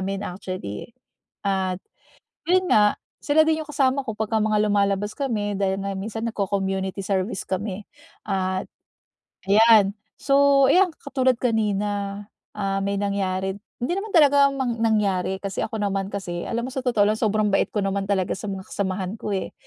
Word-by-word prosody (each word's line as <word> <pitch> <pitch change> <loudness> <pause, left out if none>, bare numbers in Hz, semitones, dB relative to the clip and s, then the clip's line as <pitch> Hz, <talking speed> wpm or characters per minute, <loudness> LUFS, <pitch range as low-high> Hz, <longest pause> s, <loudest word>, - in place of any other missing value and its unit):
amin 195 +1 -3
actually 180 - -6
eh. - - -25 0.5
At 190 -2 0 0.7
yun 370 +1 +2
nga, 210 -1 +5 0.2
sila 305 +2 +3
din 315 0 +2
yung - - -23
kasama 270 -1 +1
ko 220 - -3
pagka 220 +1 -1
mga 215 0 +2
lumalabas 200 0 +1
kami 210 -7 -1
dahil 195 0 0
nga 200 0 -3
minsan 220 +3 -5
nagco-community 195 -2 -2
service 190 +1 -1
kami, 195 +1 -4 0.4
at 190 -1 -1 0.8
ayan. 215 -1 +6 0.3
So 275 0 +4
ayan, 365 +1 +4
katulad 260 -3 0
kanina, 205 -3 -1 0.3
ah, 195 -1 -1
may 200 0 -1
nangyari, 190 -1 -1 0.3
hindi 305 - 0
naman 420 -1 -5
talaga 285 -3 +6
mang 255 -4 -2
nangyari 195 -4 +1
kasi 195 -2 -4
ako 220 - -4
naman 195 -1 -1
kasi, 175 -3 -4
alam 235 +1 -2
mo - - -7
sa 265 - -3
totoo 235 -5 +3
lang, 215 +1 0
sobrang 215 -1 +1
bait 195 - +2
ko 210 - -1
naman 195 0 -1
talaga 195 -2 0
sa 210 +2 -7
mga 190 -1 -4
kasamahan 190 -1 -2
ko 210 - -4
eh, 190 - -3
205 Hz, 165 wpm, -24 LUFS, 195-230 Hz, 0.8 s, ayan